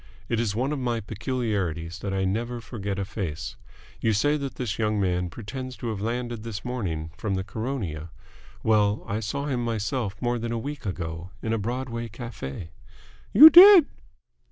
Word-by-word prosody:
It 115 - 0
is 110 -4 -1
one 130 +5 0
of 150 - -2
my 120 -2 -1
peculiarities 100 - -3
that 100 - -4
I 95 0 0
never 120 +5 -2
forget 100 -4 -5
a 100 - -2
face. 80 -7 -5 0.4
You 110 - +1
say 145 +9 +2
that 140 -3 -4
this 115 -4 -3
young 105 -1 +1
man 90 -2 0
pretends 125 +6 -7
to 115 +2 -4
have 105 -3 -4
landed 120 +1 -3
this 110 -1 -6
morning 85 -11 -3
from 105 -4 -1
the 95 - -2
Caronia? 95 - -4 0.5
Well, 105 -1 +2
I 100 +2 -2
saw 140 +7 -3
him 130 -4 -1
myself 110 -2 -2
more 120 0 -1
than 115 +1 -3
a 115 - -1
week 140 0 -5
ago 85 -1 -5
in 110 - -1
a 115 - 0
Broadway 120 +1 -3
cafe." 100 - -7 0.6
"You 315 +2 +11
did?" 365 -1 +10
110 Hz, 180 wpm, -26 LUFS, 95-125 Hz, 0.6 s, You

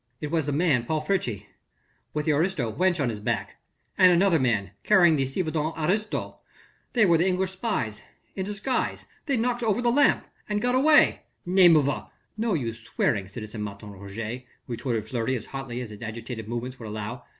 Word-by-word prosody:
"It 150 - -5
was 160 -3 0
the - - 0
man 145 -5 +2
Paul 155 +3 -1
Friche... 125 - -1 0.7
with 150 -1 -2
the 160 - +3
aristo 150 - 0
wench 180 +2 +1
on 135 -4 +1
his 110 -2 -4
back... 105 -2 -3 0.4
and 185 -1 +8
another 175 -1 +4
man 105 -7 0
carrying 175 -6 +5
the 135 -2 0
ci 135 +8 -1
devant 155 -1 -2
aristo... 200 +7 -1 0.5
they 225 -4 +5
were 170 -3 +4
the 175 - +3
English 185 0 0
spies... 185 - -2 0.3
in 190 - -2
disguise... 210 +6 -2 0.2
they 275 -3 +1
knocked 245 +1 0
over 220 -1 +1
the 240 -1 +2
lamp... 285 +4 +4 0.2
and 210 0 0
got 245 +3 +1
away...." 300 +4 +5 0.2
"Name 180 -2 +6
of 145 -3 +4
a...." 140 - -3 0.3
"No 220 -2 0
use 115 -6 -3
swearing, 110 -3 -1
citizen 105 +1 -7
Martin 105 0 -7
Roget," 105 +5 -6 0.2
retorted 115 -2 -3
Fleury 115 +3 -1
as 115 - -5
hotly 135 -3 -5
as 120 -3 -7
his 105 - -11
agitated 115 0 -6
movements 120 +2 -5
would 115 - -7
allow. 110 +4 -5
145 Hz, 190 wpm, -26 LUFS, 115-190 Hz, 0.7 s, and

